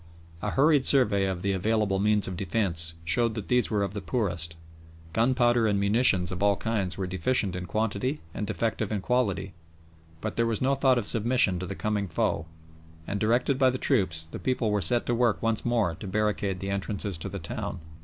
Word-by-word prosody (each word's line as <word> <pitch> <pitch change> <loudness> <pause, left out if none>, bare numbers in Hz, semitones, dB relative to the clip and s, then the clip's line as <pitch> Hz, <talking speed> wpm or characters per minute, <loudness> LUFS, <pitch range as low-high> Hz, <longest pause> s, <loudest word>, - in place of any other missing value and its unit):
A - - -2
hurried 145 0 +3
survey 105 -9 +4
of 95 -2 -4
the 100 - +1
available 100 0 0
means 105 0 +2
of 95 - -4
defence 85 -3 +1
showed 110 +7 +2
that 110 -4 -6
these 125 -1 +2
were 105 -2 0
of 100 -1 -3
the 105 - -4
poorest. 85 -4 -2 0.6
Gunpowder 120 0 +2
and 100 -2 +1
munitions 100 -3 +3
of 90 0 -5
all 100 0 +3
kinds 100 -5 -2
were 95 - -2
deficient 95 +2 0
in 90 0 -5
quantity 110 - -1
and 105 - -4
defective 110 -1 -2
in 105 -2 -1
quality, 100 -5 -1 0.7
but - - -5
there 115 0 +2
was 115 -2 0
no 135 +2 +2
thought 130 -2 +3
of 120 - -1
submission 115 -5 +1
to 90 - -5
the 100 - -5
coming 105 -1 -2
foe, 80 -1 -1 0.6
and, 100 +3 -3
directed 120 +5 +1
by 130 -1 +5
the 130 - -2
troops, 95 - 0
the 80 - -9
people 125 -4 -1
were 105 -1 +1
set 120 +8 +2
to 120 - 0
work 120 -2 +2
once 115 -1 0
more 115 -8 +1
to 95 - -9
barricade 100 -2 -1
the 95 0 -3
entrances 100 0 -2
to - - -5
the - - -6
town. - - -5
105 Hz, 205 wpm, -27 LUFS, 95-120 Hz, 0.7 s, by